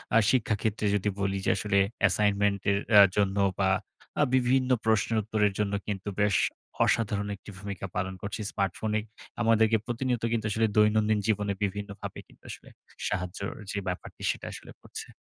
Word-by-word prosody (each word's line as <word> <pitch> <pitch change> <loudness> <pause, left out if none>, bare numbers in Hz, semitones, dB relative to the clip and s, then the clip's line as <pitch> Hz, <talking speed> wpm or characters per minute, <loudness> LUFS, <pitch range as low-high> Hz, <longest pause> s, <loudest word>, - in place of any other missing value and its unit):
আ - - +8
শিক্ষাক্ষেত্রে 110 -3 0
যদি 105 0 0
বলি 95 0 0
যে - - +2
আসলে 100 +1 0 0.2
অ্যাসাইনমেন্টের 100 0 +2 0.2
আ - - +12
জন্য 100 -1 +1 0.2
বা, 95 -1 +3 0.5
আ - - +6
বিভিন্ন 130 0 +2 0.2
প্রশ্নের 110 0 +2
উত্তরের 105 -1 +1
জন্য 105 -1 0
কিন্তু 100 0 -3
বেশ 105 -1 +3 0.5
অসাধারণ 105 -2 0
একটি 100 - -14
ভূমিকা 100 0 -6
পালন 95 0 -1
করছে। 105 +2 -4
স্মার্টফোনে 105 +3 -1 0.4
আমাদেরকে 110 -1 +4
প্রতিনিয়ত 120 0 -2
কিন্তু 115 -2 -1
আসলে 110 +2 +2
দৈনন্দিন 105 0 +4
জীবনে 105 -2 +1
বিভিন্নভাবে 100 0 -4
কিন্তু - - -23
আসলে - - -10 0.4
সাহায্যর 90 +2 -3 0.2
যে 105 - -4
ব্যাপারটি, 90 0 -5
সেটা - - -8
আসলে - - -10
করছে। - - -8
105 Hz, 150 wpm, -28 LUFS, 100-110 Hz, 0.5 s, আ